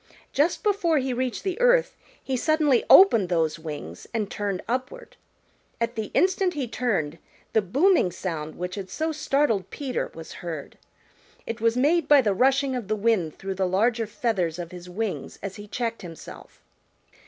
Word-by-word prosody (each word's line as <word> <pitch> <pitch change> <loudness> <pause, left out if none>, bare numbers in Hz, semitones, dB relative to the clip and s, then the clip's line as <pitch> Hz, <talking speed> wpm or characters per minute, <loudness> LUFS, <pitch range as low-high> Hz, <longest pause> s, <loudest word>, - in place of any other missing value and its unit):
Just 315 +9 +1
before 395 -7 +2
he 265 -2 0
reached 250 0 -2
the 395 +4 -3
earth - - +4 0.3
he 265 - -2
suddenly 300 -2 +2
opened 230 - +7
those 165 -2 0
wings 145 - -7
and 210 -3 -1
turned 200 -3 -3
upward. 260 - -4 0.6
At 230 0 -1
the 220 -2 -3
instant 375 -1 +2
he 275 -4 -2
turned, 180 -11 -1 0.3
the 220 - +4
booming 270 - +3
sound 160 -4 -5
which 180 +1 -5
had 195 -2 -6
so 315 +10 -2
startled 275 - 0
Peter 270 -4 -3
was 165 0 -9
heard. 165 -5 -7 0.7
It 230 -1 -5
was 230 +1 +2
made 300 +4 +3
by 290 -2 +7
the 210 -5 +1
rushing 265 +5 +2
of 240 -6 -4
the 215 - 0
wind 205 -7 0
through 195 0 -4
the 190 0 0
larger 225 +5 +1
feathers 190 -7 -1
of 175 -1 -6
his 180 0 -10
wings 210 +2 -4
as 195 0 -5
he 205 0 -9
checked 230 +1 -3
himself. 165 -3 -11
230 Hz, 170 wpm, -25 LUFS, 185-280 Hz, 0.7 s, opened